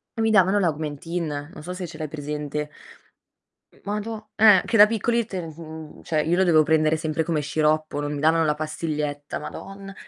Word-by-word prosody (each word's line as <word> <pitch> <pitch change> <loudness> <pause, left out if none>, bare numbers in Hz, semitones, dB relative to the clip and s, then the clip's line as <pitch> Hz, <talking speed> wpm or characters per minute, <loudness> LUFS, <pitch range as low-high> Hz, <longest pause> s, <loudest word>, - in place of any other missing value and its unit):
e 225 - -2
mi 225 - +2
davano 195 0 +4
l'Augmentin, 155 -2 -3
non 150 - -10
so 180 - -5
se 180 -1 -5
ce 160 - -10
l'hai 155 -1 -4
presente. 150 0 -4 1.0
Mhmm, - - -24
madò 210 +1 -4
eh. 210 -4 +7
Che 230 - +1
da 210 -1 +9
piccoli 230 +2 0
te 190 -3 -5
n 160 -1 -10
cioè 155 -2 0
io 165 +3 +1
lo 190 - +3
dovevo 160 -3 +5
prendere 155 0 +3
sempre 160 0 -1
come 160 -2 -1
sciroppo, 155 0 0
non 145 0 -3
mi 145 - -4
davano 160 +2 +3
la 150 -1 +2
pastiglietta, 150 -1 -4
Madonna. 195 0 -9
160 Hz, 190 wpm, -24 LUFS, 150-190 Hz, 1.0 s, da